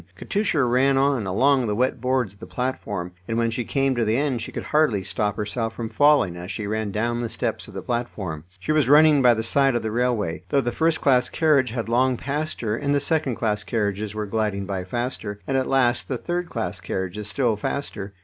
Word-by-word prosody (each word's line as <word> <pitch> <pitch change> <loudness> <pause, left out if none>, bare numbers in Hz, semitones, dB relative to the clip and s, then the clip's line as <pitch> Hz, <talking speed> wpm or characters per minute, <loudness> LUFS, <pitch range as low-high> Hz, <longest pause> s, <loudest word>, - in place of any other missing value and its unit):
Katusha 200 -8 0
ran 130 +3 +3
on, 135 -6 +2
along 130 +6 +3
the 105 - 0
wet 125 +1 0
boards 125 -5 0
of 100 - -23
the - - -9
platform, 105 -8 -3 0.2
and 115 - -1
when 115 0 +1
she 120 +2 -2
came 135 +3 +1
to 120 - +1
the 110 +1 +1
end 135 -4 0
she - - -6
could - - -5
hardly 150 -11 +2
stop 105 +1 -1
herself 115 +2 -3
from 115 -2 -4
falling 145 -7 +4
as 90 +1 -7
she 110 - -4
ran 110 0 -2
down 120 +4 -1
the 120 - -3
steps - - -3
of - - -13
the - - -5
platform. 100 -10 -3 0.2
She 95 - -2
was 155 -4 +2
running 150 0 +7
by 125 -2 +6
the 110 - -2
side 135 +3 +2
of 120 - -1
the 110 - -2
railway, 115 -8 0
though 140 - +3
the 120 -3 -1
first 160 +4 +1
class 125 -3 +3
carriage 145 -6 +3
had 115 0 -3
long 125 +2 +2
passed 150 +5 -3
her, 110 -2 0
and 140 +3 0
the - - +3
second 145 -3 0
class 105 -2 -1
carriages 105 -2 -2
were 105 0 -2
gliding 105 -2 -1
by 95 -2 -3
faster, 120 -2 -4
and 135 - -1
at 130 -1 0
last 125 -2 +2
the 130 - -2
third 175 +5 -3
class 110 - -3
carriages 95 +2 -4
still 120 -2 +1
faster. 105 -3 -4
120 Hz, 225 wpm, -24 LUFS, 105-135 Hz, 0.2 s, running